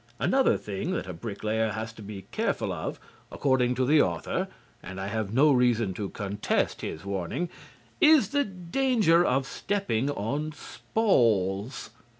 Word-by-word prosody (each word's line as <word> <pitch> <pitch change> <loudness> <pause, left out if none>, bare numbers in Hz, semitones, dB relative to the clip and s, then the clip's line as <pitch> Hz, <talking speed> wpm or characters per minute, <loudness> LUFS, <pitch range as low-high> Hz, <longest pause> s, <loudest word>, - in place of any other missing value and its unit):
Another 265 0 +3
thing 105 - -4
that - - -2
a 90 - -6
bricklayer 110 +3 -2
has 110 +1 -5
to 110 - -12
be 100 -2 -8
careful - - -1
of, - - -5 0.3
according 130 -3 +1
to 130 +1 +1
the 150 +3 +5
author 85 -2 -1 0.3
(and 95 0 -8
I 95 - -3
have 110 -2 -2
no 140 +6 +5
reason 120 -6 +2
to 100 +1 -4
contest 105 -1 -1
his 80 - -6
warning), 100 - -2 0.5
is 310 -2 +6
the 285 0 +2
danger 190 -2 +2
of 135 -3 +1
stepping 145 - -1
on 145 +6 -2
spawls. 115 - 0
120 Hz, 150 wpm, -27 LUFS, 100-165 Hz, 0.5 s, is